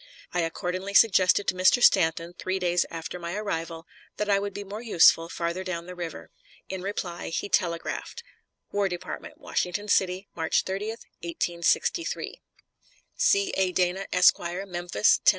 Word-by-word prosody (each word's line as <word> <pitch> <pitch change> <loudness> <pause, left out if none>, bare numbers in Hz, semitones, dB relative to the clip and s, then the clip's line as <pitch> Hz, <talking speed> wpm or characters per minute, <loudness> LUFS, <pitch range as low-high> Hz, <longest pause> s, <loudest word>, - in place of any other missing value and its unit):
I 175 - 0
accordingly 180 +4 -3
suggested 200 -2 +5
to - - +2
Mr. 185 +6 +4
Stanton, 165 +1 +4
three 185 +1 -3
days 175 -1 +1
after 165 +2 -6
my 170 +1 -5
arrival, 165 -5 -4 0.3
that 210 -1 0
I 200 - +4
would 200 0 -3
be 205 - -4
more 205 +3 -7
useful 165 -6 +5
farther 170 +2 -3
down 170 -2 -4
the 180 - -8
river. 175 -2 -7 0.4
In 190 -1 -4
reply 180 -3 -4
he 165 +5 -3
telegraphed: 175 - -1 0.5
WAR 200 -1 +1
DEPARTMENT, 245 - -7
WASHINGTON 205 - -2
CITY, 190 0 +1
March 160 -1 +1
30, 195 +2 -3 0.3
1863. 170 - -1 0.7
C. 400 -1 +3
A. 190 -1 +1
DANA, 180 +2 0
Esq., 180 0 +5
Memphis, 175 - +1
Tenn. - - -49
180 Hz, 150 wpm, -26 LUFS, 170-200 Hz, 0.7 s, suggested